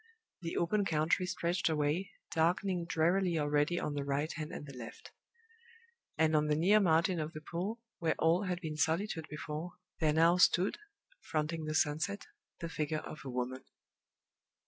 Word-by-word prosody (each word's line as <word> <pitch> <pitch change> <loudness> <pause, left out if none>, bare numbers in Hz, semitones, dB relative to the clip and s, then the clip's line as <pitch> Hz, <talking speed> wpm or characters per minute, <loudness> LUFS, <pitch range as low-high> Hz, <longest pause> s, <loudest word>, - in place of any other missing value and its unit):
The 170 -1 -3
open 205 +5 +2
country 165 +1 +1
stretched 180 -1 0
away, 155 +5 0 0.2
darkening 175 +2 +1
drearily 175 +1 +2
already 150 +3 +1
on 150 - -2
the 145 -1 -2
right 140 +3 -1
hand 155 -1 -5
and - - -6
the 140 -2 -10
left. 120 -2 -9 1.1
And 160 0 +3
on 150 0 +3
the 150 - +2
near 190 +7 +5
margin 170 -1 +3
of 155 +1 -3
the 155 - -7
pool, 185 +8 -4 0.2
where 165 -2 +1
all 170 +5 +3
had 180 -1 -2
been 155 -3 -4
solitude 160 +2 0
before, 150 +3 -5 0.3
there 155 -2 +3
now 165 +3 +5
stood, 180 - +4 0.4
fronting 155 0 -2
the 155 0 -2
sunset, 155 +7 0 0.4
the 170 - -2
figure 155 -1 -2
of 155 - -8
a 135 - -6
woman. 125 +1 -3
160 Hz, 165 wpm, -33 LUFS, 150-175 Hz, 1.1 s, near